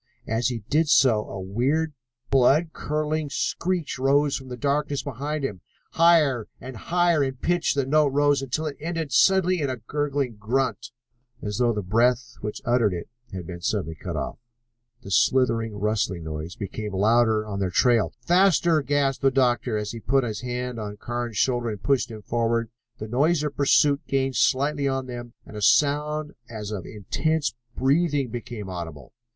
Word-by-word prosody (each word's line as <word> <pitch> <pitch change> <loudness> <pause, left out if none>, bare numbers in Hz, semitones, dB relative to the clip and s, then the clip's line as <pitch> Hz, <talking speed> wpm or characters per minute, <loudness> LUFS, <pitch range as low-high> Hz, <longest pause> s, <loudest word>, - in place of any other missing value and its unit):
As 115 +1 0
he 120 -4 -3
did 155 +2 +2
so 120 -7 +4
a 95 - -6
weird, 130 +12 0 0.4
blood 140 +5 +4
curdling 150 0 -2
screech 170 +1 -2
rose 140 +2 +3
from 130 - -6
the 125 -1 -7
darkness 145 +1 -1
behind 145 +3 -4
them. 100 -9 -4 0.3
Higher 155 -9 +4
and 130 +1 -8
higher 170 +3 +2
in 135 -1 -2
pitch 175 +5 0
the 140 -2 +1
note 150 +2 +3
rose 145 0 +2
until 135 +4 -2
it 150 -2 -4
ended 165 -2 -3
suddenly 185 +4 +4
in 140 - 0
a 130 - -3
gurgling 140 0 -2
grunt, 125 +5 -1 0.5
as 105 +1 -3
though 120 -1 +3
the 105 -3 -3
breath 115 +5 +1
which 105 0 -5
uttered 115 -5 +2
it 85 - -7 0.2
had 90 -2 -6
been 85 0 -8
suddenly 80 -1 -1
cut - - -6
off. - - -4 0.6
The 100 - -9
slithering, 115 -1 +2
rustling 100 -4 -1
noise 80 +2 -6
became 105 +1 -5
louder 110 +2 +3
on 100 -2 -4
their 95 -2 0
trail. 115 +4 +3
"Faster!" 175 -3 +3
gasped 140 -1 0
the 135 - +4
doctor, 125 -3 +1
as 105 -1 -3
he 115 - -7
put 135 +4 +1
his 110 -3 -4
hand 125 -1 -4
on 105 -1 -6
Carnes' 120 -1 -4
shoulder 120 0 +1
and 105 -3 -6
pushed 135 -3 +1
him 110 -2 -9
forward. 115 0 0 0.3
The 110 - -6
noise 145 +7 +2
of 150 -2 -3
pursuit 140 0 +3
gained 135 -1 0
slightly 140 +4 +2
on 135 -1 -1
them, 120 -2 -8
and - - -12
a 105 - -5
sound 150 +4 +2 0.2
as 110 -2 -6
of 100 -5 -5
intense 150 - -1 0.2
breathing 140 -1 +1
became 115 -3 -6
audible. 80 - -7
130 Hz, 175 wpm, -25 LUFS, 110-145 Hz, 0.6 s, so